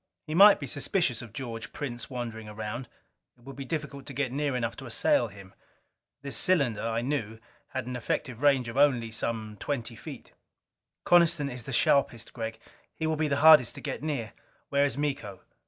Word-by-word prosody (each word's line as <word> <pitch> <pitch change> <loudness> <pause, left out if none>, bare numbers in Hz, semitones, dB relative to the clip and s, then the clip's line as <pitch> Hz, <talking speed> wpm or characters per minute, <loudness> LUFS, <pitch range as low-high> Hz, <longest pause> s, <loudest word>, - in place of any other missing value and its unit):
He 155 - -5
might 200 +4 +8
be 140 - -4
suspicious 140 - -1
of 120 -3 -10
George 115 -3 -6
Prince 125 -4 -5
wandering 115 -4 -5
around: 110 +3 -5 0.5
it 120 - -24
would 135 +1 -9
be 140 - -6
difficult 140 -2 -5
to 140 - -7
get 135 -2 -1
near 140 0 -1
enough 115 -2 -1
to - - -8
assail - - +2
him. 95 -1 -13 0.7
This 140 -1 -5
cylinder, 140 - +1
I 115 0 -1
knew, 120 -5 -2 0.3
had 130 -2 -4
an 125 0 -5
effective 125 +1 -3
range 135 -4 +4
of 115 +3 -6
only 125 -6 +3
some 110 -1 -4
twenty 120 -5 -3
feet. 105 - -10 0.7
"Coniston 170 -5 +4
is 125 -2 -8
the - - -6
sharpest, 120 -3 +2
Gregg. 110 -2 -5 0.4
He 160 - -3
will 160 0 +1
be 155 0 0
the 140 -1 0
hardest 150 -7 +8
to - - -9
get 140 - -4
near." 140 -8 -3 0.4
"Where 140 0 +3
is 140 -3 -2
Miko?" 135 -10 -3
125 Hz, 190 wpm, -28 LUFS, 115-145 Hz, 0.7 s, might